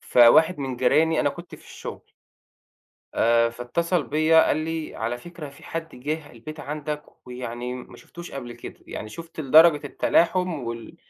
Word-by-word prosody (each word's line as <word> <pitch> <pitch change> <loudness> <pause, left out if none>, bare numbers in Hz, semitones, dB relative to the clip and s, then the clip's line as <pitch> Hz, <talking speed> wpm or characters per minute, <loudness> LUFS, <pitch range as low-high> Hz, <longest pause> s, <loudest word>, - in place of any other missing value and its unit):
فواحد 145 +8 +5
من 135 -3 -3
جيراني 155 +6 +3
أنا 145 - +2
كنت 170 +4 -10
في - - -16
الشُغل - - -8 1.1
آآ 115 0 +3
فاتصل 155 +8 -1
بيّا 155 +3 +4
قال - - +2
لي: 160 0 -4
"على 115 +2 -2
فكرة 165 +1 -9
في 140 - -17
حد 165 -3 -6
جِه 150 +4 -4
البيت 155 +7 -10
عندك 150 0 -4 0.2
ويعني 125 0 -5
م 125 - -9
ما - - -12
شفُتوش 175 0 -11
قبل 120 -3 -7
كده." - - -10
يعني 110 - -6
شُفت 165 +6 -10
لدرجة 155 +1 +6
التلاحم 180 +4 +2
وال 115 -1 -6
150 Hz, 160 wpm, -24 LUFS, 125-165 Hz, 1.1 s, لدرجة